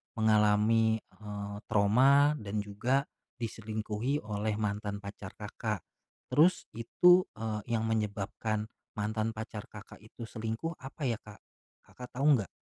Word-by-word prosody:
mengalami, 110 +1 +4
eee, 105 -1 -7
trauma 130 +8 +5
dan 105 0 -3
juga, 120 +7 0 0.3
diselingkuhi 110 +3 -3
oleh 105 0 -1
mantan 105 -1 -2
pacar 100 -1 -8
Kakak? 105 -2 -4 0.5
Terus 170 +5 +5
itu, 180 +10 +5
eee, 110 -1 -3
yang 110 - 0
menyebabkan 110 0 -1 0.3
mantan 110 +1 -1
pacar 110 +1 -6
Kakak 105 -2 -12
itu 110 +3 -11
selingkuh, 115 +8 -4
apa 135 +3 -8
ya, 115 -4 0
Kak? 105 -1 -13 0.4
Kakak 125 - -10
tahu 140 0 +5
nggak? 100 - -3
110 Hz, 125 wpm, -31 LUFS, 105-115 Hz, 0.5 s, trauma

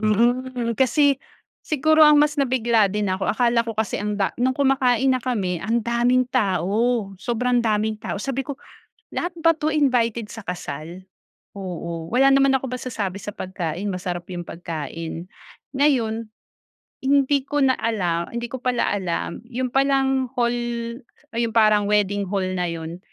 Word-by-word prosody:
Mhm, 235 +2 +1
kasi 275 +2 +3 0.5
siguro 310 +1 +4
ang 300 -1 +7
mas 300 +1 +2
nabigla 240 -5 +2
din 210 -1 -1
ako 185 +1 0
akala 235 0 +2
ko 230 - -4
kasi 220 0 -1
ang 210 0 -2
da 200 -2 +1
nung 255 +2 +2
kumakain 265 -2 +2
na 260 - +4
kami 200 -8 -1
andaming 235 +5 +1
tao, 215 0 +1
sobrang 240 +4 0
daming 215 0 +1
tao 205 -1 -5
sabi 270 +3 -2
ko 275 0 -7 0.5
lahat 350 - -1
ba 330 0 +4
to 310 0 -1
invited 245 -7 +1
sa 225 +2 -9
kasal? 175 -2 -6 0.6
Oo, 170 -3 -5
wala 270 +2 +5
naman 275 0 +4
ako 265 0 0
masasabi 230 -6 -4
sa 205 +1 -7
pagkain, 180 -1 -4
masarap 180 -1 -4
yung 175 -1 -5
pagkain. 165 0 -6 0.5
Ngayon 230 -6 +1 0.7
hindi 280 +1 +3
ko 290 +1 -1
na 260 - +4
alam, 175 -7 -1
hindi 235 0 -3
ko 260 - -5
pala 250 -2 +1
alam 185 -3 -3
yun 255 +1 -2
palang 270 -1 +2
hall, 240 -1 +2 0.8
ah, 230 - -2
yung 230 - 0
parang 215 -2 +5
wedding 205 -1 +1
hall 195 -1 0
na 180 0 0
yun 165 +1 -6
230 Hz, 155 wpm, -23 LUFS, 195-260 Hz, 0.8 s, ang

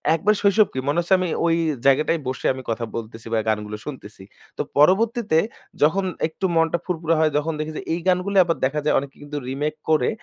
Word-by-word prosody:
একবার 205 +6 +2
শৈশব 205 +1 +4
কী 130 - -2
মনে 145 +4 +2
হচ্ছে, 175 +2 +1
আমি 185 - 0 0.2
ওই 165 -1 +3 0.3
জায়গাটায় 150 +4 +3
বসে 130 0 -4
আমি 130 0 -8
কথা 115 +1 -2
বলতেছি 115 0 -7
বা, 115 - +3
গানগুলো 105 -1 -1
শুনতেছি। 110 -9 -9 0.3
তো - - 0 0.2
পরবর্তীতে 195 +3 +3 0.4
যখন 190 +6 +3 0.2
একটু 160 +4 -5
মনটা 165 +1 +2
ফুরফুরা 165 -2 0
হয়, 155 -1 +3
তখন 160 +2 -1
দেখি 155 +1 -3
যে - - -4
এই 170 - -1
গানগুলোই 185 +2 +2
আবার 165 -1 0
দেখা 145 +3 -1
যায় 150 - +3
অনেকে 140 0 -9
কিন্তু 145 0 -6
রিমেক 145 +3 -2
করে, 155 -1 +3
155 Hz, 200 wpm, -22 LUFS, 135-180 Hz, 0.4 s, শৈশব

